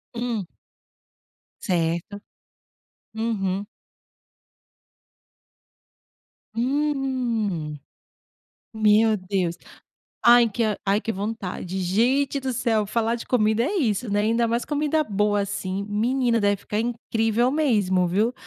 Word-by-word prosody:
Hum. 230 -5 -2 1.2
Certo. 175 +2 -1 0.9
Uhum. 205 -3 -2 2.9
Hum. 245 - -1 0.9
Meu 215 0 +4
Deus, 185 -3 -2 0.7
ai 240 -1 +7
que 230 +3 -2 0.2
ai 200 +2 +2
que 225 - -4
vontade, 190 -3 -4
gente 255 +10 +1
do 265 -1 -3
céu 220 -3 +1
falar 230 +2 0
de 235 - -9
comida 220 -1 +2
é 370 +9 -1
isso, 240 - 0
né, 205 +1 +1
ainda 230 +2 +2
mais 235 +1 -1
comida 300 +1 0
boa 205 -3 0
assim, 200 0 -3
menina 235 +3 +1
deve 205 -1 +2
ficar 210 - -4
incrível 230 0 0
mesmo, 205 - +2
viu. 210 +7 +1
220 Hz, 100 wpm, -24 LUFS, 200-240 Hz, 2.9 s, ai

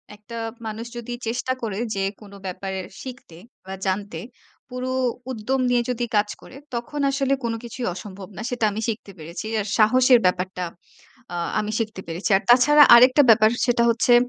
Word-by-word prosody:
একটা 210 +3 -12 0.3
মানুষ 220 +2 -5
যদি 240 +1 -6
চেষ্টা 245 +2 -1
করে, 210 -4 -3 0.2
যে 195 - -1 0.2
কোনো 200 -1 -13
ব্যাপারে 190 +1 -4 0.2
শিখতে 245 -10 -10 0.3
বা 190 - -7
জানতে, 190 -3 -2 0.5
পুরো 250 +1 -4 0.4
উদ্যম 255 +3 -1
নিয়ে 245 -1 +3
যদি 240 -1 -1
কাজ 210 0 +2
করে, 265 - -14 0.2
তখন 265 +5 -4
আসলে 275 0 +1
কোনো 230 -1 -1
কিছুই 240 +1 -5
অসম্ভব 190 0 -9
না - - -5
সেটা 245 -3 0
আমি 215 +2 -4
শিখতে 210 -3 -4
পেরেছি। 170 +6 -7
আর 205 - -2
সাহসের 250 +3 +5
ব্যাপারটা, 180 0 0 0.7
আ - - -3 0.2
আমি 215 0 -2
শিখতে 220 -4 -3
পেরেছি। 170 +6 -3
আর - - -5
তাছাড়া 290 +5 +7
আরেকটা 255 +4 +7
ব্যাপার 215 -1 +7 0.2
সেটা 240 -1 +2
হচ্ছে, 235 +1 +3
225 Hz, 170 wpm, -23 LUFS, 200-245 Hz, 0.7 s, তাছাড়া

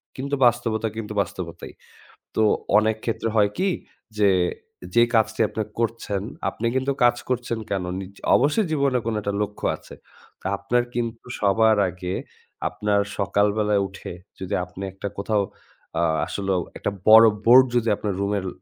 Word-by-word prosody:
কিন্তু 140 +2 -2
বাস্তবতা 115 -2 +1
কিন্তু 105 -1 -5
বাস্তবতাই। 85 -4 -6 0.6
তো 110 - +3 0.3
অনেক 110 0 +3
ক্ষেত্রে 115 -1 -1
হয় 105 -1 +4
কি 195 +1 +2 0.5
যে, 100 -1 +4 0.6
যেই 120 0 +5
কাজটি 110 0 +2
আপনে 110 - -2 0.2
করছেন, 115 -4 -1 0.3
আপনে 115 - -6
কিন্তু 130 +1 +1
কাজ 120 0 +5
করছেন 120 -2 -1
কেনো? 95 -2 -2
নিজ 95 0 -8 0.2
অবশ্যই 150 - +3
জীবনে 140 -4 +2
কোনো 115 -1 -1
একটা 100 0 -2
লক্ষ্য 105 0 -4
আছে। - - -13 0.5
তো - - -24
আপনার 120 +5 +1
কিন্তু 115 -1 -3
সবার 110 +2 +4
আগে 90 +1 -5 0.6
আপনার 105 -1 +1 0.2
সকালবেলায় 105 +1 +2
উঠে 95 - -9 0.3
যদি 95 - -5
আপনে 90 +2 -9
একটা 95 - -5
কোথাও 100 0 +1 0.6
আ - - +2 0.2
আসলেও 95 -2 -1 0.2
একটা 105 - -2 0.2
বড় 110 +1 +10 0.2
বোর্ড 130 +3 +8
যদি 115 -2 +2
আপনার 100 0 -3
রুমে 100 -1 -1
110 Hz, 150 wpm, -23 LUFS, 100-120 Hz, 0.6 s, বড়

